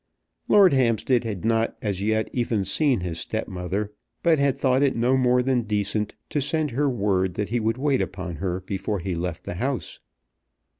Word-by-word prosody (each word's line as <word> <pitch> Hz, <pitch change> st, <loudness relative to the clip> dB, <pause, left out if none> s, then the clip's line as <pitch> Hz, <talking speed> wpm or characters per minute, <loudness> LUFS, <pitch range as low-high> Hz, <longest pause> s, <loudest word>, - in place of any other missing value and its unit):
Lord 195 Hz, -6 st, +6 dB
Hampstead 120 Hz, -1 st, +2 dB
had 105 Hz, -3 st, -4 dB
not 115 Hz, 0 st, +1 dB
as 100 Hz, -3 st, -2 dB
yet 110 Hz, +1 st, +1 dB
even 115 Hz, -5 st, 0 dB
seen 125 Hz, -, +2 dB
his 85 Hz, -2 st, -4 dB
stepmother, 95 Hz, +3 st, -3 dB, 0.3 s
but 165 Hz, -3 st, +4 dB
had 140 Hz, -2 st, +2 dB
thought 130 Hz, 0 st, +2 dB
it 140 Hz, -2 st, +2 dB
no 120 Hz, +3 st, +2 dB
more 125 Hz, -1 st, +3 dB
than 130 Hz, -1 st, +2 dB
decent 105 Hz, -1 st, -1 dB, 0.2 s
to 145 Hz, -, 0 dB
send 150 Hz, +1 st, -1 dB
her 140 Hz, +4 st, +1 dB
word 95 Hz, -6 st, 0 dB
that 105 Hz, -, -2 dB
he 120 Hz, +2 st, 0 dB
would 115 Hz, +1 st, 0 dB
wait 140 Hz, -1 st, +1 dB
upon 90 Hz, -3 st, -4 dB
her 90 Hz, +2 st, -2 dB
before 100 Hz, +2 st, -3 dB
he 95 Hz, +1 st, -3 dB
left 85 Hz, 0 st, -4 dB
the -, -, -5 dB
house. 130 Hz, -2 st, -3 dB
110 Hz, 185 wpm, -24 LUFS, 95-130 Hz, 0.3 s, Lord